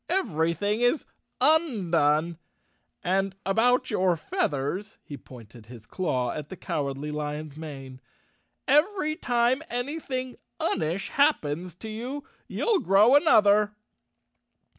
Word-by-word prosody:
"Everything 205 - 0
is 245 +5 +2 0.3
undone; 170 - +2 0.6
and 190 +1 0
about 245 +6 +2
your 185 -4 +2
feathers," 155 +7 -2
he 145 - -8
pointed 115 -4 -14
his 115 -2 -12
claw 130 -9 -1
at 150 0 -6
the 190 - -8
Cowardly 140 -1 -3
Lion's 150 0 -5
mane, 135 -4 -9 0.7
"every 310 +1 +2
time 245 0 +1
any¬ 270 +7 -3
thing 255 -2 -4 0.2
unish 165 +5 -1
happens 180 - +1
to 220 - -9
you 245 +6 -5 0.2
you'll 445 -5 +1
grow 205 - +5
another. 210 -9 +4
195 Hz, 110 wpm, -26 LUFS, 150-250 Hz, 0.7 s, grow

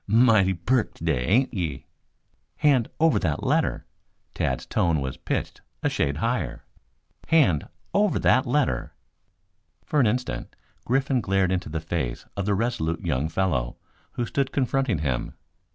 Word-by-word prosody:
"Mighty 110 -4 +4
perk 115 +7 0
today, 75 -7 -1
ain't 125 +7 +3
ye?" 85 - -3 0.7
"Hand 140 -6 +3
over 160 0 +4
that 80 -5 -1
letter!" - - +1 0.5
Tad's - - -1
tone 85 -3 +1
was 65 -1 -3
pitched - - -3 0.2
a - - +1
shade 70 0 0
higher. 120 +7 -2
[Illustration: - - -32
"Hand 130 - +3 0.3
Over 205 -1 +3
That 130 +1 +3
Letter!"] 140 +2 0 0.9
For 150 - +1
an 125 - +5
instant 125 +4 -2 0.3
Griffin 135 0 +1
glared 95 -2 +1
into 90 -4 -1
the 80 +1 -2
face 80 -7 -3
of 100 0 -3
the 100 - +2
resolute 90 -7 -1
young 70 +5 -1
fellow 80 -9 -1 0.4
who 120 - -2
stood 135 +3 -1
confronting 135 - +1
him. 65 -5 -2
100 Hz, 145 wpm, -25 LUFS, 80-130 Hz, 0.9 s, an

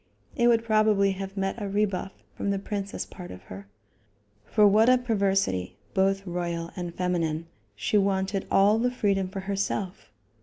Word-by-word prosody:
It 240 - +3
would 230 -1 +4
probably 215 -3 +3
have 195 +1 -6
met 195 +3 -2
a 200 - -3
rebuff 200 -1 -1 0.2
from 200 - -3
the 200 - +1
princess 200 0 -4
part 180 -2 -10
of 90 0 -10
her; 100 +1 -10 0.8
for 210 -1 +4
what 215 +4 +5
a 255 - +6
perversity, 195 - 0 0.2
both 195 +1 +1
royal 170 -2 -3
and 175 -1 -5
feminine, 170 -3 -1 0.3
she 205 - +1
wanted 195 0 0
all 205 +3 +4
the 245 +2 +2
freedom 200 -6 0
for 195 +1 -6
herself. 190 - -3
195 Hz, 160 wpm, -27 LUFS, 180-210 Hz, 0.8 s, a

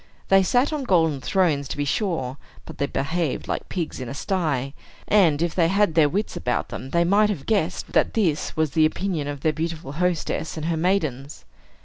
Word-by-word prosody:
They 195 0 +6
sat 245 - +2
on 295 -3 -2
golden 160 - +2
thrones, 155 -5 +1
to - - -5
be 145 - -1
sure; 145 - -1 0.3
but - - -11
they 140 - +1
behaved 160 +2 -2
like - - -3
pigs 170 -4 -4
in 125 -2 -5
a 135 - -6
sty; 140 -7 -1 0.3
and, 170 -7 +4
if 170 - -1
they 170 -3 +3
had 200 +3 +3
had - - -9
their 155 -2 +4
wits 205 +7 -2
about 125 0 -2
them, 130 - -7
they 170 +5 +2
might 205 +4 +3
have 170 -10 -3
guessed 185 -5 -1
that - - +2
this 170 -8 0
was 155 -2 +1
the 155 +1 +4
opinion 165 -3 -3
of 145 -1 -5
their 155 - +1
beautiful 160 -2 -4
hostess 165 0 -1
and 155 - -4
her 165 0 0
maidens. 155 -6 -1
160 Hz, 210 wpm, -23 LUFS, 145-185 Hz, 0.3 s, They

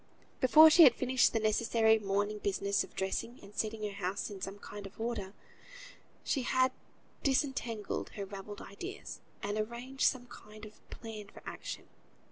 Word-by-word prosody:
Before 310 +5 +8
she 340 - +7
had 265 -7 +9
finished 255 0 +3
the 225 - +1
necessary 220 +1 +3
morning 205 +1 -1
business 200 0 0
of - - -14
dressing, 195 +5 -3
and 200 +1 -13
setting 215 0 -2
her 210 - -2
house 190 +3 -2
in 195 -2 -8
some 195 +1 -5
kind 205 0 -8
of 195 - -17
order, 220 -4 -3 0.9
she 275 - 0
had 255 +1 +2 0.5
disentangled 260 -6 -1
her 200 - -3
ravelled 200 +1 -8
ideas, 370 - -8 0.2
and 205 +1 -1
arranged 240 +5 -2
some 255 -2 0
kind 215 -2 -12
of 210 0 -14
a - - -12
plan 220 -3 -8
for - - -14
action. - - -7
215 Hz, 165 wpm, -32 LUFS, 205-250 Hz, 0.9 s, had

